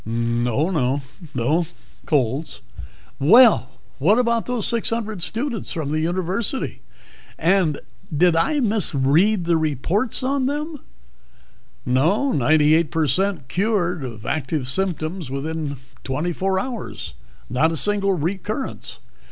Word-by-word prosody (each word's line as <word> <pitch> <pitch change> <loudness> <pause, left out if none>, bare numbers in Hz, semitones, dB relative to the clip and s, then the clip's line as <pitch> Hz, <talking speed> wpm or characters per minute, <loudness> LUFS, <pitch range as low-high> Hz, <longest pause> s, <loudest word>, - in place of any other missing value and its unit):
"Oh, 115 - 0
no. 140 -4 0 0.3
No 150 +8 +1 0.4
colds." 135 +2 0 0.6
"Well, 195 - +6 0.3
what 190 - +4
about 235 -2 +1
those 245 -4 -1
six 235 -2 0
hundred 220 -4 -3
students 230 - -2
from 155 -3 -3
the 155 - 0
University? 185 +9 -1 0.6
Did 175 -1 +1
I 280 - +2
misread 185 - +2
the 170 -1 +3
reports 160 - -1
on 265 0 +1
them?" 300 +2 -3 1.1
"No 165 - +2
98 155 - +3
per 160 0 0
cent 175 0 0
cured 180 -2 0
of 115 -4 -7
active 145 -2 -2
symptoms 165 0 -2
within 145 +1 -3 0.3
twenty 150 +7 -2
four 190 +2 0
hours. 235 - -6 0.3
Not 140 +7 +2
a 165 - -2
single 200 +2 +1
recurrence. 190 - -4
170 Hz, 115 wpm, -22 LUFS, 145-210 Hz, 1.1 s, Well